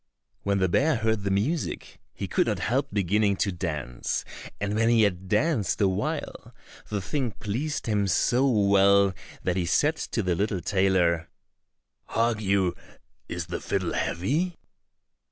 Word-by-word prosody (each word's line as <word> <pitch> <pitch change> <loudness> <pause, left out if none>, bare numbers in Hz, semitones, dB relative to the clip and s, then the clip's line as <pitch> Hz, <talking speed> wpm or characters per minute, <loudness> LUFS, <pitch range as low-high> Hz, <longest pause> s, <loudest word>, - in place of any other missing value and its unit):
When 100 0 0
the 95 -1 +2
bear 145 - +2
heard 110 -2 0
the 100 - -2
music, 115 +13 -2
he - - -5
could - - +1
not - - 0
help 135 +4 0
beginning 100 +1 +2
to 100 +1 0
dance, 75 -9 -3 0.3
and 100 0 -2
when 115 +2 +2
he 115 -2 +5
had 95 -2 0
danced 105 - +1
a 100 - +4
while, 95 0 -3 0.3
the 100 -3 -2
thing 125 +1 -2
pleased 120 +9 -3
him 105 -3 +1
so 125 +8 +2
well 100 -3 +4 0.3
that 90 0 0
he 90 -2 0
said 150 - +2
to 115 - -2
the 90 -1 +1
little 100 +2 -1
tailor, 90 -3 +1 0.8
"Hark 115 -1 0
you, 95 -3 +2 0.6
is - - -3
the - - -5
fiddle - - -1
heavy?" 155 - -1
100 Hz, 155 wpm, -26 LUFS, 95-115 Hz, 0.8 s, he